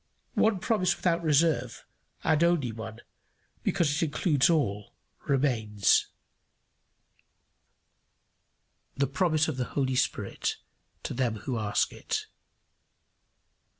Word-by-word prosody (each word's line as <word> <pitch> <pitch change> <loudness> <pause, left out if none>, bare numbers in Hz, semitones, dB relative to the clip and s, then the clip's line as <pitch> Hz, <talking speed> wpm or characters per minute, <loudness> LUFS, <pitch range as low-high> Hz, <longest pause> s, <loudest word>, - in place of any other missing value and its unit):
One 220 -2 +3
promise 185 -2 +1
without 170 -1 0
reserve, 150 -6 +1 0.4
and 155 +1 +3
only 170 -8 +2
one, 110 +1 -8 0.6
because 170 -6 +1
it 150 +4 0
includes 150 -2 +2
all, 105 -11 0 0.3
remains: 115 -7 +2 2.9
the 140 - +2
promise 155 +2 +1
of 155 -5 -3
the 125 - -1
Holy 130 -2 +1
Spirit 110 -5 -1 0.5
to - - -4
them 120 -3 0
who 125 -4 -2
ask 105 -1 0
it. - - -3
140 Hz, 100 wpm, -28 LUFS, 120-165 Hz, 2.9 s, One